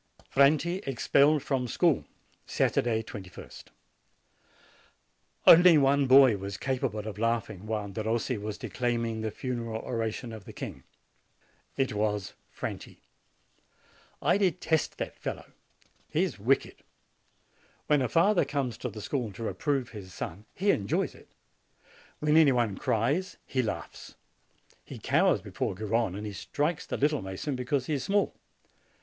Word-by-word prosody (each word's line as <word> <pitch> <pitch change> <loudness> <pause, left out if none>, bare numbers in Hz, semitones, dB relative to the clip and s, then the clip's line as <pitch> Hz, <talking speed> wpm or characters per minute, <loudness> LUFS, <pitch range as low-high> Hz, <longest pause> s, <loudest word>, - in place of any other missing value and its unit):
FRANTI 155 +7 +3
EXPELLED 140 +3 +3
FROM 130 -3 -1
SCHOOL - - +2 0.4
Saturday, 115 -1 +1
2ist. 95 -4 -10 1.8
Only 175 -1 +9
one 140 0 +3
boy 130 -4 +7
was 100 0 -5
capable 125 -5 -2
of 105 -2 -6
laughing 110 -3 -1
while 105 -2 -2
Derossi 110 +5 -1
was 105 0 -5
declaiming 115 -2 -2
the 110 - -1
funeral 115 -3 -4
oration 115 0 -3
of 110 -3 -10
the - - -10
king. - - -7 0.9
It 135 -3 0
was 105 -2 -1 0.2
Franti. - - -7 1.2
I 200 - +3
detest 180 -4 0
that - - -4
fellow. - - -6 0.6
He - - +1
is - - -3
wicked. - - +1 1.1
When 150 -2 +3
a 125 - 0
father 175 - +4
comes 140 -5 -3
to 125 - -3
the 105 0 -8
school 125 -7 -2
to 115 - -7
reprove 135 +1 -1
his 100 -4 -10
son, 95 +6 -6
he 200 +2 +3
enjoys 100 -1 0
it; - - -18 0.9
when 150 +1 +2
any 155 -4 +7
one 120 -5 +1
cries, 140 - 0
he 130 - 0
laughs. 115 - -6 0.7
He - - -9
cowers - - +2
before - - -3
Garrone, 110 -1 -1
and 105 - -6
he 105 - -5
strikes 150 - -2
the - - -3
little 150 +1 +1
mason 95 +10 -4
because 125 +1 -1
he 155 - -2
is 140 - -1
small. 200 +1 +1
120 Hz, 140 wpm, -29 LUFS, 110-145 Hz, 1.8 s, Only